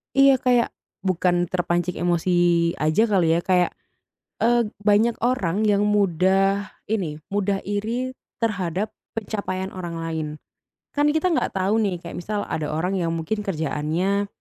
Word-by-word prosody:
Iya, 275 0 +7
kayak 245 -2 +3 0.4
bukan 175 -1 +2
terpancing 175 0 -1
emosi 175 +1 +1 0.4
aja 155 +8 +2
kali 180 -6 +3
ya. 170 - +2
Kayak, 180 0 +2 0.7
eee, 235 -1 +3 0.2
banyak 215 +3 +4
orang 215 -5 +1
yang 205 -1 +3
mudah 195 0 +2
ini, 185 -9 -2 0.2
mudah 200 -1 0
iri 230 +6 -2 0.2
terhadap 200 -3 -1 0.2
pencapaian 195 -3 -3
orang 175 -3 -5
lain. 165 -1 -3 0.7
Kan 290 0 +2
kita 315 +4 +2
nggak 315 - 0
tahu 195 +4 +2
nih, 190 -5 -1
kayak 170 - -6
misal 205 +3 -2
ada 155 -1 -3
orang 180 +6 -1
yang 165 -1 -1
mungkin 165 +7 -2
kerjaannya, 170 +4 0
195 Hz, 135 wpm, -23 LUFS, 175-215 Hz, 0.7 s, Iya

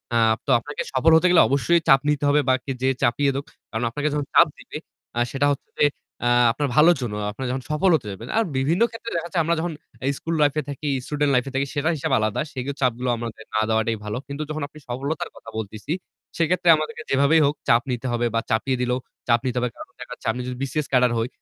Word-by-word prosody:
আ - - +4 0.3
তো - - -8
আপনাকে 145 +5 -6
সফল 150 +5 +4
হতে 180 +3 +5
গেলে 180 - +7
অবশ্যই 170 +5 +3
চাপ 135 0 +7
নিতে 150 -1 0
হবে 145 +1 +4
বা - - +6
কে 135 - -3
যে 130 - +2
চাপিয়ে 140 +3 +2
দেক। 140 - -3 0.3
কারণ 115 +1 -2
আপনাকে 145 +5 -2
যখন 145 -1 -1
চাপ 170 - +8
দিবে, - - -8 0.4
আ - - +2
সেটা 140 +1 +1
হচ্ছে 140 - -5
যে, - - +4 0.4
আ - - +3 0.2
আপনার 145 +3 -1
ভালোর 165 +3 +6
জন্য। 115 -4 -3 0.2
আপনি 120 - -11
যখন 130 -1 -3
সফল 150 +5 +2
হতে 120 -8 -3
যাবেন 105 +5 -8
আর 225 - +4
বিভিন্ন 160 +10 +1
ক্ষেত্রে 230 0 -7
দেখা 170 +1 -2
যায় 170 - +3
আমরা 170 +2 +1
যখন 170 0 -2 0.4
school 165 0 -3
life 145 0 +3
এ - - +1
থাকি, 145 +1 -4 0.2
student 145 -1 0
life 125 +1 +2
এ - - -10
থাকি 140 +1 +1
সেটার 155 +3 +1
হিসাব - - -3
আলাদা। 110 +6 0
সেই 130 -2 -4 0.2
চাপগুলো 125 0 0
আমাদের 115 -1 -6
না 110 - +3
দেওয়াটাই 110 0 +1
ভালো। 105 +3 -3
কিন্তু 140 +2 -4
যখন 155 0 -3
আপনি 155 - -15
সফলতার 140 +5 -3
কথা 115 - -12
বলতেছি। 110 +8 -5 0.4
সেক্ষেত্রে 170 +1 +2
আমাদেরকে 155 0 -5
যেভাবেই 140 +4 +4
হোক 145 - +1
চাপ 115 0 +5
নিতে 125 +1 -3
হবে 120 0 0
বা - - +3
চাপিয়ে 130 +4 +1
দিলেও 125 +1 0 0.3
চাপ 120 0 +4
নিতে 125 -1 -1
হবে। 125 0 0
কারণ - - -11
দেখা - - -9
যাচ্ছে, - - -9
আমি 125 +2 -5
যদি 125 - -4
BCS 140 +2 -2
ক্যাডার 125 -2 +4
হই। 115 +1 0
140 Hz, 235 wpm, -23 LUFS, 120-155 Hz, 0.4 s, চাপ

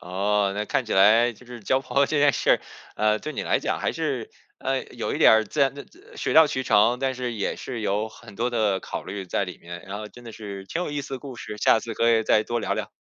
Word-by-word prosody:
哦， 100 +2 0
那 105 +1 -2
看 125 - -1
起 110 - -4
来 110 +5 +5
就 125 - -18
是 120 -1 -10
交 130 +6 +1
朋 135 - -10
友 140 - +5
这 155 - 0
件 145 -1 +5
事 - - +1
儿， - - +2 0.3
呃， 110 0 +2
对 155 - -6
你 - - -3
来 - - +1
讲 - - -2
还 - - 0
是， - - -3 0.3
呃， - - -1
有 - - -5
一 - - -2
点 - - +7
儿 110 0 +4
自 145 - -4
然 135 0 +3
的 140 - -8 0.3
水 - - -2
到 160 -1 +8
渠 130 -2 -2
成， 115 +2 +3
但 135 -1 0
是 125 -1 -3
也 105 - -2
是 120 -3 -6
有 105 +1 -1
很 100 - -14
多 120 +2 0
的 110 -5 +1
考 - - -6
虑 95 0 -6
在 100 - 0
里 90 - -9
面， 85 +1 -9
然 100 +1 -5
后 110 - -6
真 120 +4 -14
的 115 - -9
是 100 -3 -8
挺 170 - -3
有 150 - -4
意 145 - -2
思 135 - -6
的 - - -5
故 135 -2 -9
事， 105 -2 -8
下 110 - +4
次 115 -1 -6
可 115 - +2
以 110 -1 +3
再 110 0 +3
多 120 -1 -2
聊 - - -1
聊。 - - -4
110 Hz, 305 characters per minute, -25 LUFS, 105-130 Hz, 0.3 s, 到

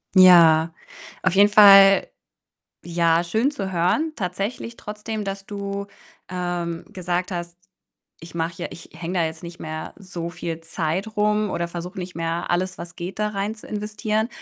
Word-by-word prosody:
Ja. 165 -3 +7 0.5
Auf - - +2
jeden 200 +1 +6
Fall, 195 -2 +8 0.8
ja, 170 0 +2
schön 220 +10 +1
zu 195 -9 -5
hören 185 - +1
tatsächlich, 200 +4 -4
trotzdem, 210 0 -5
dass 195 0 -5
du, 200 -1 -5 0.4
ähm, 175 -2 -3
gesagt 180 0 -3
hast: 175 0 -5 0.6
„Ich 165 +1 -12
mache 165 0 -3
ja - - -3
ich 170 - -12
hänge 170 +2 -5
da 165 - +3
jetzt 160 +1 -7
nicht 170 0 -9
mehr 155 0 -6
so 175 -4 -6
viel 165 -1 -5
Zeit 175 +6 -3
rum 210 -1 +2
oder 170 - -2
versuche 175 +3 -7
nicht 180 0 -6
mehr, 165 +1 -2
alles, 180 +1 -1
was 170 0 -8
geht, 180 +4 -6
da 210 - +1
rein 205 +1 -3
zu - - -13
investieren“, 215 +1 -2
180 Hz, 160 wpm, -23 LUFS, 170-205 Hz, 0.8 s, Fall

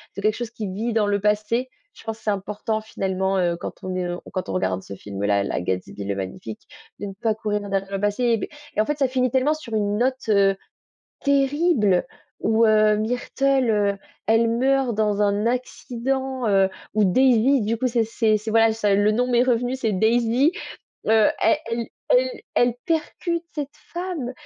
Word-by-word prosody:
c'est 200 - -5
quelque 215 +1 +2
chose 240 -1 -5
qui 215 -3 -5
vit 220 +5 -2
dans 215 -2 +2
le 200 0 +1
passé. 215 +4 0 0.2
Je - - -15
pense 225 0 -4
c'est 215 - -3
important 210 +2 -2
finalement, 190 -2 -1
heu, 170 -1 +1
quand - - -8
on 185 0 -3
est 180 -1 -1
lo 175 0 -4
quand 185 -2 -3
on - - -2
regarde 95 0 -1
ce 100 - -9
film-là, 100 0 -1
là - - -2
Gatsby 95 +2 -4
le 100 0 -2
Magnifique, 100 +3 -6 0.4
de 205 - -4
ne 195 - -7
pas 220 -2 +1
courir 210 -1 -2
derrière 195 0 -2
le 195 - -2
passé. 225 +3 +1
Beh - - -4 0.3
et - - -1
en - - +1
fait 295 0 -2
ça 270 - +3
finit 255 -2 +1
tellement 270 +4 +2
sur 250 -8 -9
une 205 -1 0
note, 255 -1 -1
heu, 195 -2 +4 0.7
terrible 280 - +2 0.3
où, 225 +1 +3
heu, 215 -1 +4
Myrtle, 250 +3 0
heu, 200 -2 +1 0.3
elle 225 +1 +3
meurt 260 0 +1
dans 210 -1 +1
un 205 +1 +1
accident, 255 0 -2
heu, 195 -1 +3 0.2
où 215 -1 +3
Daisy 255 +5 +4
du 225 +2 0
coup 255 +2 +1
c'est 235 -1 +1
c'est 220 -1 +1
c'est 220 +2 -5
voilà 225 0 +4
ça 210 -2 +1
le 205 +1 +3
nom 245 +3 +1
m'est 240 0 +4
revenu 245 +1 +1
c'est 225 -5 -1
Daisy, 235 - +3 0.5
heu, 220 -1 +5
elle 235 -7 +1
e - - -8 0.2
elle 255 +1 +2 0.2
elle 245 -1 +3
percute 335 +1 -1
cette 295 0 -5 0.2
femme 340 -8 -4
220 Hz, 195 wpm, -23 LUFS, 200-255 Hz, 0.7 s, heu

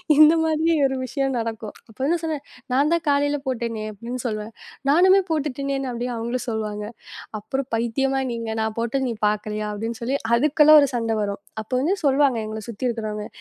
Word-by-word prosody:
இந்த 310 +2 +8
மாதிரி 320 +1 +2
ஒரு 265 0 0
விஷயம் 270 +1 -1
நடக்கும். 225 -2 -4 0.2
அப்ப 225 +3 -11
என்ன 340 +2 +2
சொன்னேன்? 310 -3 -3 0.3
நான் 285 +4 +3
தான் 335 - +1
காலையில 285 +1 +2
போட்டேனே 230 -3 -2
அப்படின்னு 235 +4 -6
சொல்லுவேன். 215 -1 -3 0.4
நானுமே 370 +6 +6
போட்டுட்டேனே 275 -3 -1
அப்படின்னு 245 +1 -3
அவங்களும் 235 +2 -3
சொல்லுவாங்க. 210 -1 -3 0.5
அப்புறம் 265 +5 -3
பைத்தியமா 270 +4 0
நீங்க, 230 -1 -4
நான் 220 -1 -2
போட்டது 250 +3 0
நீ - - -1
பாக்கலையா? 210 0 -2
அப்படின்னு 225 +2 -4
சொல்லி, 260 +4 0 0.2
அதுக்குலாம் 300 +3 +6
ஒரு 280 - +2
சண்டை 225 -1 0
வரும். 200 -1 -3 0.2
அப்ப 215 - -27
வந்து 360 +8 +2
சொல்லுவாங்க 275 -3 +3
எங்களை 215 0 -6
சுத்தி 235 +3 -3
இருக்கிறவங்க. 215 -2 -4
245 Hz, 170 wpm, -23 LUFS, 220-280 Hz, 0.5 s, இந்த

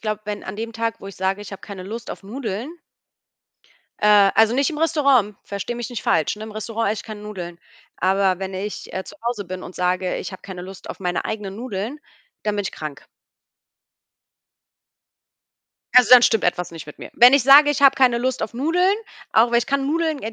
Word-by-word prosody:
glaube, 215 -1 -3
wenn 210 -1 -5
an 190 +2 -6
dem 230 +1 -5
Tag, 230 0 -3
wo 195 - -10
ich 195 - -9
sage: 190 +2 -1
„Ich 205 - -9
habe 195 - -8
keine 195 -3 -9
Lust 220 +4 -7
auf - - -8
Nudeln“ 225 +3 -5 1.3
äh, 205 -2 +5
also 220 +2 +4
nicht 275 +4 +2
im 300 - -5
Restaurant, 275 -10 +2
verstehe 200 +4 -5
mich 240 +1 -5
nicht 240 - -5
falsch, 155 +5 +1
ne? 215 - -9
Im 220 - -9
Restaurant 220 0 -2
esse 215 -1 -3
ich - - -14
keine 215 -1 -8
Nudeln. 180 -5 -7 0.4
Aber 190 0 +2
wenn 190 0 -5
ich, 200 +3 -6
äh, 190 - -4
zu 205 - -12
Hause 235 -4 -2
bin 185 0 -7
und 180 - -10
sage: 180 0 0
„Ich - - -6
habe 190 - -10
keine 185 -2 -8
Lust 190 +1 -9
auf - - -10
meine 180 -2 -2
eigenen 210 -2 -5
Nudeln“, 235 +3 -5 0.4
dann 210 -1 -1
bin 205 - 0
ich - - -4
krank. 150 -2 -8 2.9
Also, 250 -1 +7
dann 250 -1 +10
stimmt 225 -4 +3
etwas 175 0 -1
nicht 165 -2 -9
mit 150 - -12
mir. - - -9
Wenn 245 +2 +8
ich 280 -3 +4
sage: 290 +2 +8
„Ich 285 - -1
habe 275 -1 +7
keine 250 -3 +3
Lust 255 +1 -1
auf 220 - -4
Nudeln“, 355 - +2 0.4
auch 230 +2 +4
weil 235 - +5
ich 240 - -2
kann 275 -1 0
Nudeln 315 -1 0
äh, 220 - -4
215 Hz, 215 wpm, -22 LUFS, 190-245 Hz, 2.9 s, dann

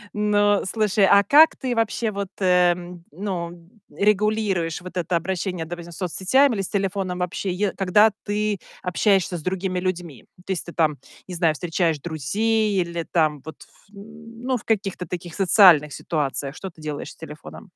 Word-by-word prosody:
Ну 205 -1 +2
слушай, 210 -2 +2
а 200 +2 +6
как 300 +10 +6
ты 255 -3 -3
вообще 225 0 0
вот, 200 -1 -4
м, 180 -2 +1
ну, 170 -1 -5 0.2
регулируешь 205 -5 0
вот 185 0 -10
это 175 -1 -1
обращение, 180 0 -2
допустим, 175 0 -8
с 165 - -11
соцсетями 200 - +2
или 195 - -1
с 190 - -5
телефоном 195 -2 -2
вообще, 180 +2 -3
е 190 +2 -1
когда 205 +3 +4
ты 210 -1 -1 0.2
общаешься 185 -1 +1
с - - -8
другими 185 +2 -2
людьми? 175 -8 -4 0.2
То - - -4
есть 175 - -4
ты 170 - -9
там, 155 -3 +1 0.3
не 185 - -7
знаю, 165 -3 +1
встречаешь 165 0 0
друзей 200 - 0
или 170 -1 -2
там 155 -4 +1
вот 160 -1 -9
ф - - -23 0.2
ну 225 +4 -7
в 220 - -12
каких-то 195 -4 -2
таких 175 -1 -6
социальных 180 -6 +5
ситуациях, 140 -2 -3
что 190 - -7
ты 165 - -21
делаешь 150 -2 -6
с - - -15
телефоном? 160 +5 -11
185 Hz, 170 wpm, -23 LUFS, 170-205 Hz, 0.3 s, а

